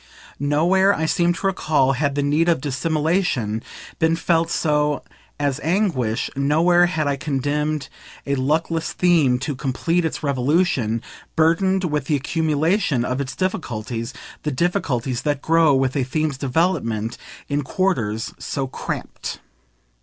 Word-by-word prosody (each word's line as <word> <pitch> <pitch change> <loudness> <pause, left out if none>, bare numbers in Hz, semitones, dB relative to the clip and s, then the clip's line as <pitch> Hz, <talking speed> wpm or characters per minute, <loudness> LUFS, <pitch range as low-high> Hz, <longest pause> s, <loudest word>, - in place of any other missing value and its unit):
Nowhere, 175 +8 +3
I 160 - -1
seem 170 +2 +2
to 175 - -6
recall, 155 -8 +2
had 140 +1 0
the 145 - +1
need 150 +4 +2
of 165 - +3
dissimulation 150 - 0 0.4
been 160 0 +3
felt 165 0 +1
so 150 -3 +1 0.4
as 145 -1 0
anguish; 155 - 0
nowhere 165 +6 +4
had 160 -4 -1
I 140 -1 +1
condemned 150 +1 -1 0.4
a 140 - -1
luckless 160 +4 0
theme 160 -8 +3
to 140 +3 -3
complete 155 +7 0
its 160 - -3
revolution, 135 -4 +1 0.3
burdened 185 +4 +3
with 150 -5 -1
the 150 - +1
accumulation 155 - +1
of 125 +2 -1
its 130 -1 -5
difficulties, 120 - -3 0.3
the 150 - -2
difficulties 130 -5 -1
that 145 -2 0
grow 160 -2 +4
with 130 0 +1
a 135 - +1
theme's 145 +1 -1
development, 130 - 0 0.3
in 145 0 0
quarters 125 - -1
so 135 -2 -3
cramped. 130 - -5
150 Hz, 135 wpm, -22 LUFS, 130-165 Hz, 0.4 s, nowhere